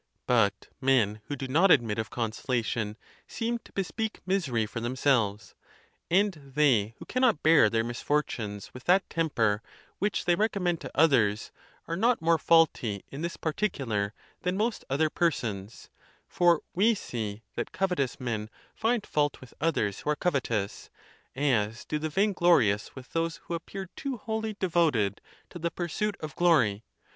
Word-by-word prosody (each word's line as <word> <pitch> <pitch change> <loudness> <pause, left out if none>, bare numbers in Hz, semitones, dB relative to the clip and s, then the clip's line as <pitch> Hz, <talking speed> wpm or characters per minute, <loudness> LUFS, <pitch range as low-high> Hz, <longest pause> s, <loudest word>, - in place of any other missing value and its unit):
But - - +2
men 115 -6 +2
who 145 - -3
do 135 -1 -5
not 165 +9 +4
admit 115 -8 +4
of 110 - -3
consolation 115 -2 -2 0.3
seem 235 0 -2
to - - -19
bespeak 215 +3 -3
misery 155 - 0
for 105 +2 -5
themselves; 120 -4 0 0.6
and 200 +3 +3 0.2
they 115 -8 +3
who - - -10
can 255 - -2
not 230 - +3
bear 155 -8 +6
their 115 +1 +1
misfortunes 120 -4 -2
with 125 - -11
that 190 +2 +4
temper 115 -10 +1 0.4
which 205 +1 0
they 175 - +4
recommend 180 -3 0
to - - -7
others 120 -10 +3 0.4
are 165 - -2
not 230 +6 +2
more 165 0 +3
faulty 140 - +3
in 140 - -6
this 170 +1 -3
particu 160 -2 -2
lar 105 -2 -1 0.3
than 180 +2 -1
most 220 +2 -1
other 150 +3 +1
persons; 115 - -2 0.4
for 175 -2 +3
we 220 +5 +4
see 110 - -5
that - - -4
covetous 180 -10 -1
men 110 -4 -3 0.2
find 225 -1 0
fault 145 -2 0
with 130 - -14
others 110 -11 0
who - - -4
are 150 - +3
covetous, 120 - -1 0.5
as 120 -5 0
do 150 - -2
the 155 +1 -2
vainglorious 170 - +2
with 130 -1 -11
those 165 0 0
who - - -6
appear 190 +3 -5
too 275 -3 -4
wholly 220 0 -3
devoted 155 - +1 0.3
to 175 - -8
the 170 +1 -1
pursuit 190 +5 -2
of 155 -2 -6
glory. 125 -13 +3
150 Hz, 155 wpm, -28 LUFS, 115-180 Hz, 0.6 s, bear